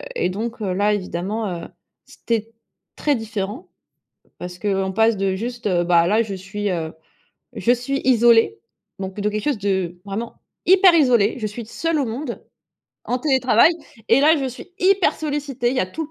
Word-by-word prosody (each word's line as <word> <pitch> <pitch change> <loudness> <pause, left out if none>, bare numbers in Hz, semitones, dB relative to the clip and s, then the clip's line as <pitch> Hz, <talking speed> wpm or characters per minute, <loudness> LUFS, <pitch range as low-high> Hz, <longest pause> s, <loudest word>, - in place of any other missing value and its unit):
et 180 - 0
donc 225 +4 -5
heu, 190 -3 -1
là, 205 +2 +2
évidemment, 200 +2 -3
heu, - - -7 0.4
c'était 225 -1 -3 0.4
très 290 -2 +1
différent, 215 0 -5 0.7
parce 180 0 -8
qu'on 195 -2 -1
passe 225 +1 +2
de 195 -1 0
juste, 240 +3 -5
heu: 175 -2 +2
«Ben 170 -1 +4
là, 215 +4 +3
je 200 -3 -6
suis, 200 +2 -4
heu, 165 -3 -3 0.6
je 240 - +1
suis 250 +3 -1
isolée», 230 - +4 0.4
bon, 190 -1 -3
plutôt 210 +2 -2
quelque 210 0 -3
chose 290 -6 0
de, 190 -3 -1
vraiment, 215 +4 -5 0.3
hyper 370 -1 +6
isolé. 240 -8 +4
Je 215 - -2
suis 215 +2 -7
seule 330 +6 -1
au 275 - +1
monde, 235 +3 -5 0.6
en 250 - -1
télétravail 260 0 +4 0.4
et 240 +4 +5
là 310 +2 +5
je 270 -2 -2
suis 260 +9 -9
hyper 385 0 +3
sollicitée, 285 -5 -2
il 265 - -3
y - - +2
a 185 - 0
tout 320 +13 -5
le 305 - -13
225 Hz, 185 wpm, -21 LUFS, 195-260 Hz, 0.7 s, hyper